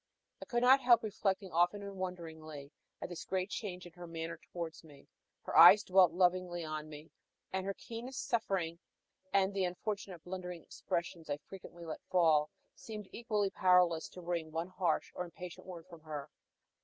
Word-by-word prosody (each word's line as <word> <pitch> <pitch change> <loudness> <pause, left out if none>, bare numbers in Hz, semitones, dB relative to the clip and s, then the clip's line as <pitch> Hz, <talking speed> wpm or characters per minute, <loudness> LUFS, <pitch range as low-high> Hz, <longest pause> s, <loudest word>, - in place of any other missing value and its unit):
I - - -6
could 240 -1 0
not 260 +2 +8
help 240 -2 +6
reflecting 195 -3 -1
often 175 +5 +2
and 200 0 -7
wonderingly 160 -6 -6 0.3
at - - -4
this 175 - -6
great 190 +1 -2
change 185 -5 -5
in 175 - -10
her 175 0 -9
manner 165 0 -5
towards 170 -2 -5
me. 145 -3 -16 0.4
Her - - -5
eyes 180 +6 +10
dwelt 185 -2 +5
lovingly 180 -1 +1
on 155 0 -5
me, 150 +1 -11 0.4
and 190 0 -1
her 195 - -2
keenest 245 +4 -6
suffering, 195 -9 0 0.5
and 195 0 +3
the 195 -1 0
unfortunate 185 -1 -4
blundering 180 -2 -6
expressions 170 -2 -4
I 145 - 0
frequently 175 0 -11
let 160 - -6
fall, 160 -4 +4 0.2
seemed 210 -3 -8
equally 210 -4 -1
powerless 180 -3 +4
to 180 - -10
wring 170 -2 -3
one 165 +3 -3
harsh 180 -4 0
or 180 - -3
impatient 180 +1 -9
word 175 -3 -8
from 170 -3 -13
her. 150 -2 -6
180 Hz, 170 wpm, -34 LUFS, 165-195 Hz, 0.5 s, eyes